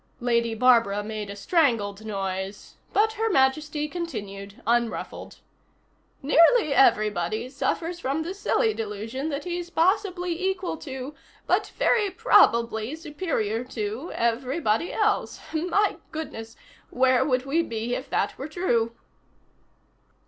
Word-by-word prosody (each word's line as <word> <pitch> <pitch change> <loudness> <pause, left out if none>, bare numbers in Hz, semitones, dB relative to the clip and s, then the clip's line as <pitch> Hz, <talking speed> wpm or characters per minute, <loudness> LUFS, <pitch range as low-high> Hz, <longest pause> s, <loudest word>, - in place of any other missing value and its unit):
Lady 235 -2 +1
Barbara 230 -4 +4
made 215 -1 -5
a 200 - -6
strangled 220 - +1
noise 195 -1 -4 0.2
but 440 +1 +2
Her 445 +1 0
Majesty 295 -1 +1
continued, 205 - -6
unruffled. 235 0 -2 0.8
"Nearly 330 - +5
everybody 215 -3 +2
suffers 330 +5 -2
from 285 +1 -1
the 345 +3 -4
silly 435 +3 +1
delusion 225 +7 -4
that 285 -1 -3
he's 350 -1 -4
possibly 360 -1 0
equal 380 -2 -1
to, 265 -1 -7 0.3
but - - +2
very 420 -4 +3
probably 235 - +3
superior 295 - -2
to, 225 +5 -4
everybody 235 +4 0
else 425 -1 0
my 360 +6 +1
goodness, 230 -8 -6 0.3
where 260 0 +3
would 255 -2 0
we 300 +5 +2
be 230 -4 -3
if 260 - -4
that - - 0
were 275 - -4
true?" 235 -9 0
265 Hz, 120 wpm, -25 LUFS, 225-340 Hz, 0.8 s, Nearly